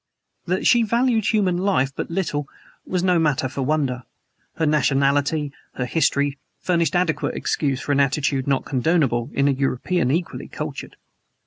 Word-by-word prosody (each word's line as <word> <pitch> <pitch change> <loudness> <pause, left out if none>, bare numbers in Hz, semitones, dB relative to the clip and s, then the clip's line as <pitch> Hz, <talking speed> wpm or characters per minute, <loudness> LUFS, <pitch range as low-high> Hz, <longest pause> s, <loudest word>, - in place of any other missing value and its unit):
That 185 +2 -1
she 240 - +5
valued 230 0 +1
human 195 -5 +2
life 180 -9 +1
but - - -4
little 160 -5 -2 0.4
was 180 -1 -1
no 180 -2 +3
matter 150 -4 +1
for 135 - -5
wonder. 135 -3 0 0.5
Her 160 - 0
nationality 145 0 +1 0.2
her 125 - -2
history 140 -1 +1 0.2
furnished 170 -4 0
adequate 175 -3 0
excuse 135 -3 -1
for - - -3
an 140 - +2
attitude 140 -1 +1
not 135 -1 +1
condonable 135 -3 +1
in 140 0 +1
a - - +4
European 135 +3 0
equally 165 +5 -2
cultured. - - -6
150 Hz, 150 wpm, -22 LUFS, 135-175 Hz, 0.5 s, she